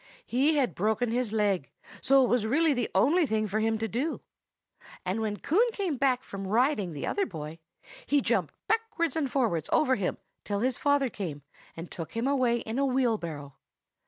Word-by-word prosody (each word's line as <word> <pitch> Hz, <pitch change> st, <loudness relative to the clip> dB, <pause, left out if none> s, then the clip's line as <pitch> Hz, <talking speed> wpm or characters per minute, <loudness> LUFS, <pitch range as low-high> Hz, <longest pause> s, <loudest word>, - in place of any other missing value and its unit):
He 280 Hz, +6 st, +2 dB
had 265 Hz, -4 st, +1 dB
broken 220 Hz, +4 st, 0 dB
his 240 Hz, -2 st, -1 dB
leg, 205 Hz, -8 st, 0 dB, 0.3 s
so 275 Hz, 0 st, +5 dB
it -, -, +2 dB
was 235 Hz, -3 st, +1 dB
really 310 Hz, +5 st, +3 dB
the 245 Hz, -3 st, -1 dB
only 300 Hz, -, +4 dB
thing 215 Hz, -2 st, 0 dB
for 210 Hz, +2 st, -1 dB
him 225 Hz, 0 st, +1 dB
to 225 Hz, +1 st, -2 dB
do. 260 Hz, +9 st, -2 dB, 0.8 s
And 190 Hz, +5 st, -1 dB
when 210 Hz, -1 st, -2 dB
Coon 435 Hz, -, +2 dB
came 380 Hz, -8 st, -1 dB
back 260 Hz, -1 st, +1 dB
from 195 Hz, -1 st, -6 dB
riding 215 Hz, -, +1 dB
the 145 Hz, -, -4 dB
other 405 Hz, -, 0 dB
boy 160 Hz, -4 st, -7 dB, 0.5 s
he 290 Hz, -, +3 dB
jumped -, -, 0 dB
backwards 445 Hz, -8 st, 0 dB
and 300 Hz, -4 st, 0 dB
forwards 220 Hz, -, 0 dB
over 260 Hz, -4 st, +3 dB
him 200 Hz, -7 st, -1 dB, 0.3 s
till 205 Hz, -1 st, -2 dB
his 255 Hz, +1 st, 0 dB
father 285 Hz, -3 st, +2 dB
came 160 Hz, -9 st, -5 dB, 0.3 s
and 165 Hz, +1 st, -7 dB
took 165 Hz, -2 st, -7 dB
him 230 Hz, +2 st, -1 dB
away 250 Hz, -4 st, +2 dB
in 225 Hz, +4 st, -3 dB
a 280 Hz, -, +3 dB
wheelbarrow. 170 Hz, -, -1 dB
235 Hz, 190 wpm, -28 LUFS, 200-275 Hz, 0.8 s, so